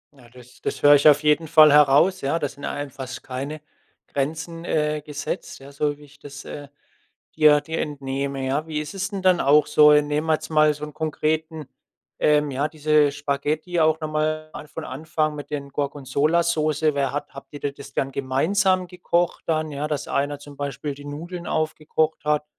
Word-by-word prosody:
Ja, 120 -3 -18
das 125 0 -17
das - - -4
höre 145 0 +8
ich 145 +2 +5
auf 150 +1 +6
jeden 150 +2 +2
Fall 155 -1 +7
heraus, 150 +6 +5
ja? 140 +4 0
Da 145 - -1
sind 140 +1 -10
einem 145 -1 -4
fast 130 -1 -8
keine 140 +4 -5 0.5
Grenzen, 160 +4 -4
äh, 150 -2 0
gesetzt, 150 -2 -5
ja, 140 +1 -12
so 145 +1 -1
wie 150 - -16
ich 145 0 -18
das, 145 0 -10
äh, 145 -1 -8 0.7
dir 150 -2 +5
dir 160 +2 -5
entnehme. 140 -1 -4
Ja, 145 +4 -1
wie 150 -1 -3
ist 150 +5 -6
es 190 0 -2
denn 195 -2 -4
dann 185 -2 +4
auch 145 +2 +4
so? 150 0 +6
Nehmen 150 +1 +2
wir 160 - +4
jetzt 155 +1 -3
mal 155 -1 +4
so 150 +1 -10
'n 150 - -11
konkreten 155 -1 -2 0.5
ähm, 150 -1 +3
ja, 140 +3 -1
diese 150 -1 +2
Spaghetti 145 +4 -2
auch 155 0 +3
noch 155 -1 -4
mal 155 0 -1
an 150 - -8
von - - -7
Anfang 155 +2 -2
mit 145 0 -8
den 140 -1 -4
Gorgonzola-Soße. 150 +2 0
Wer 140 -1 0
hat 145 0 -4
habt 140 0 -11
ihr 145 - -7
das 140 -1 -12
dann 135 0 -1
gemeinsam 185 +8 +1
gekocht 175 -1 -1
dann? 155 -1 0
Dass 150 +1 -3
einer 145 +1 -1
zum 145 0 -12
Beispiel 140 +1 -4
die 145 - -12
Nudeln 170 +5 -7
aufgekocht 155 0 -1
hat, 150 0 +1
150 Hz, 190 wpm, -23 LUFS, 140-155 Hz, 0.7 s, höre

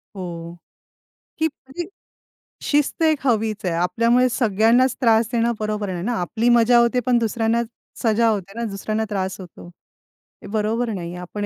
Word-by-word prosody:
हो 170 -2 -7 0.8
की 320 - +2
म्हणजे 305 +2 -7 0.8
शिस्त 295 +2 +1
एक 310 -3 +2
हवीच 220 -3 0
आहे. 175 - 0
आपल्यामुळे 230 +8 +2
सगळ्यांनाच 230 +2 +3
त्रास 225 -2 +4
देणं 235 0 +1
बरोबर 210 -1 -2
नाही 175 -1 -4
ना. 240 +5 -1
आपली 225 +7 0
मजा 240 0 +5
होते 235 +1 +3
पण 245 -1 +3
दुसऱ्यांना 230 +1 0 0.4
सजा 230 0 +3
होते 195 -2 -2
ना. - - -2
दुसऱ्यांना 215 +3 -2
त्रास 190 -1 -3
होतो 175 -1 -12 0.8
हे - - -8
बरोबर 225 +3 0
नाही 175 -3 -5
आहे. 180 - -7
आपण 205 +4 -5
225 Hz, 155 wpm, -22 LUFS, 195-240 Hz, 0.8 s, मजा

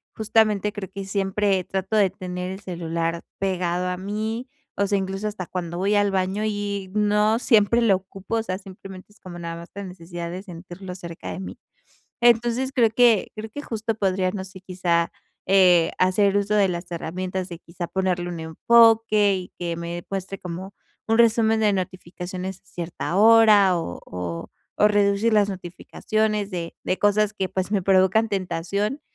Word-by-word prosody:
justamente, 215 -2 +2
creo 200 -3 -6
que 195 0 -6
siempre 195 0 0
trato 190 +3 -3
de 205 -3 +4
tener 180 -1 -5
el 190 - -7
celular 170 -3 -3 0.2
pegado 180 -2 -1
a 180 - -2
mí. 215 +6 -3 0.3
O 200 - +1
sea, 200 - +2
incluso 195 +2 -3
hasta 205 -3 -5
cuando 175 -2 -4
voy 200 +3 +1
al 205 0 +3
baño, 190 +2 0
y 205 -2 -3
no 210 +1 +3
siempre 225 -2 +4
lo 220 -4 +4
ocupo. 195 +3 -7
O 225 - -1
sea, 185 -4 -3
simplemente 190 0 -12
es, 215 - -19
como 175 -2 -10
nada 170 -1 -5
más, 170 0 -10
la 200 - -5
necesidad 175 -2 -7
de 180 +2 -5
sentirlo 180 0 -9
cerca 170 -2 -7
de - - -6
mí. 190 - -7 0.7
Entonces, 240 +2 +3
creo 235 -4 +4
que 230 -2 +4
creo 220 +1 -6
que, 290 +6 -7
justo, 225 -2 -3
podría 190 -3 0
no 190 -1 -5
sé, 190 0 -12
quizá, 180 -2 0 0.3
eh, 180 -3 +5
hacer 195 +2 +3
uso 205 +1 +1
de 205 -2 +4
las 175 0 -4
herramientas, 185 +2 -4
de 170 - -7
quizá, 175 0 -7
ponerle 180 -2 -1
un 170 - -5
enfoque, 215 +4 +4
y 185 -1 -6
que 170 -1 -3
me 170 +1 -5
muestre 195 0 -4
como 180 +2 -7 0.4
un 225 +1 +3
resumen 225 -1 +4
de 210 -1 +3
notificaciones 185 0 -5
a - - -50
cierta 175 0 -4
hora. 210 -3 +6
O 85 - -5
o 90 -2 -5 0.3
o 210 - +6
reducir 205 +2 +2
las 205 -1 +4
notificaciones 205 +3 -2
de 170 -3 -5
de 185 - -1
cosas, 205 0 +2
que 190 -2 -2
pues, 190 0 -2
me 200 -3 +1
provocan 190 +4 +3
tentación, 200 - -2
190 Hz, 175 wpm, -24 LUFS, 180-210 Hz, 0.7 s, hora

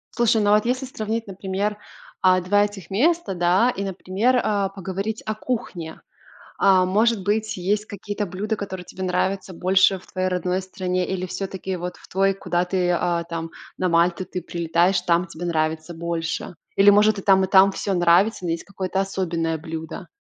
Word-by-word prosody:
Слушай, 230 -2 +3
ну 205 0 +3
вот 210 +1 +4
если 255 +2 0
сравнить, 225 -2 -4
например, 195 +2 -3 0.4
а, 185 0 +5
2 205 +3 +3
этих 200 -5 -9
места, 270 - +1
да, 180 +7 +3
и, 200 -5 -3
например, 195 +6 0
а, 200 -2 0
поговорить 195 +3 -4
о 215 - -2
кухне. 205 -9 -5 0.6
А, 190 -2 +5
может 215 +2 +2
быть, 215 +1 -1
есть 205 +4 0
какие-то 205 +1 -4
блюда, 200 +4 -3
которые 190 -3 -6
тебе 190 - -7
нравятся 185 +1 -1
больше 190 +2 +3
в - - -19
твоей 185 0 -2
родной 180 +1 -1
стране 185 -1 -2
или 185 -1 -2
всё-таки 190 0 -4
вот 180 0 -5
в - - -17
твой, 195 +1 +2
куда 180 -2 -1
ты, 180 -1 0
а, 175 -1 0
там 165 -1 -5 0.3
на 185 - 0
Мальту 170 +2 +2
ты 180 - -5
прилетаешь, 170 +2 +1
там 175 0 +2
тебе 170 +1 -7
нравится 160 0 -1
больше? 165 +1 -4 0.2
Или 200 +1 +7
может 210 0 +4
и - - -6
там, 190 -1 +4
и 190 - 0
там 195 0 +6
всё 200 +1 -2
нравится, 180 +3 +3
но 170 - 0
есть 165 - -3
какое-то 190 -1 -2
особенное 170 -4 -2
блюдо? 160 0 -7
190 Hz, 180 wpm, -23 LUFS, 175-205 Hz, 0.6 s, Или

